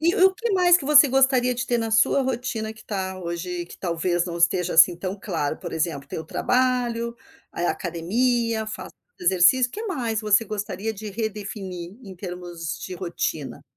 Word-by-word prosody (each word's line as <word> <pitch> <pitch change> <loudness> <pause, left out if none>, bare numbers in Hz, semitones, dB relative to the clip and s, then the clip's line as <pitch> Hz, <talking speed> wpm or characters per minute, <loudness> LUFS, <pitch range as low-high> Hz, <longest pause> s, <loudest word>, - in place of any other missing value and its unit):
E 340 +3 +3
o 380 0 +5
que 455 +3 -2
mais 355 -2 +6
que 300 - -7
você 295 0 +8
gostaria 260 -1 +3
de 240 - -2
ter 240 -1 +1
na 225 -1 -2
sua 225 +5 +4
rotina 240 -4 -2
que 220 - -16
tá 190 -2 -3
hoje 175 +1 -4
que - - -13
talvez 175 0 0
não 170 -2 -5
esteja 175 +1 +2
assim 170 +1 +7
tão 185 +2 -4
claro, 160 -7 -2
por - - -7
exemplo, 155 -4 -2
tem - - -5
o 160 - -6
trabalho, 240 +1 0 0.4
aí 170 - -3
a - - +2
academia, 220 +6 0
faz 215 - -7 0.3
exercício. 190 +8 +4
Que 435 - -6
mais 235 - -2
você 215 +1 +3
gostaria 210 0 -4
de 215 +1 -8
redefinir 200 -4 -5
em 190 -4 -10
termos 175 -3 -6
de 185 - -6
rotina? 155 -8 -4
210 Hz, 185 wpm, -24 LUFS, 175-245 Hz, 0.4 s, você